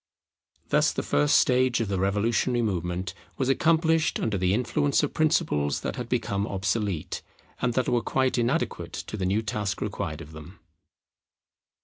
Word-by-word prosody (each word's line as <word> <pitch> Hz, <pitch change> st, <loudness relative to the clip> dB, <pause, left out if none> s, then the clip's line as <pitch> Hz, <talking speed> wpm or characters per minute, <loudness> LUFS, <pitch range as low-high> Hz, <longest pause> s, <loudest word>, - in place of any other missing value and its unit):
Thus -, -, +3 dB
the -, -, -2 dB
first 75 Hz, 0 st, +3 dB
stage 125 Hz, -1 st, +3 dB
of 115 Hz, -, -1 dB
the 95 Hz, -2 st, -1 dB
revolutionary 115 Hz, +5 st, +1 dB
movement 90 Hz, -2 st, -2 dB, 0.2 s
was 130 Hz, -1 st, 0 dB
accomplished 160 Hz, +2 st, +2 dB
under 110 Hz, -3 st, -1 dB
the 90 Hz, -1 st, +1 dB
influence 125 Hz, +7 st, +1 dB
of 145 Hz, -, -1 dB
principles 155 Hz, -, +1 dB
that -, -, -3 dB
had -, -, -5 dB
become 100 Hz, +1 st, -1 dB
obsolete, 95 Hz, -2 st, -2 dB, 0.4 s
and 120 Hz, -1 st, 0 dB
that 130 Hz, -, +1 dB
were 120 Hz, -1 st, +2 dB
quite 130 Hz, 0 st, +1 dB
inadequate 120 Hz, +1 st, -1 dB
to -, -, -5 dB
the 95 Hz, -3 st, -1 dB
new 105 Hz, +4 st, +1 dB
task 105 Hz, -2 st, -2 dB
required 85 Hz, -6 st, -3 dB
of 75 Hz, -, -11 dB
them. 80 Hz, +4 st, -11 dB
105 Hz, 155 wpm, -26 LUFS, 95-125 Hz, 0.4 s, Thus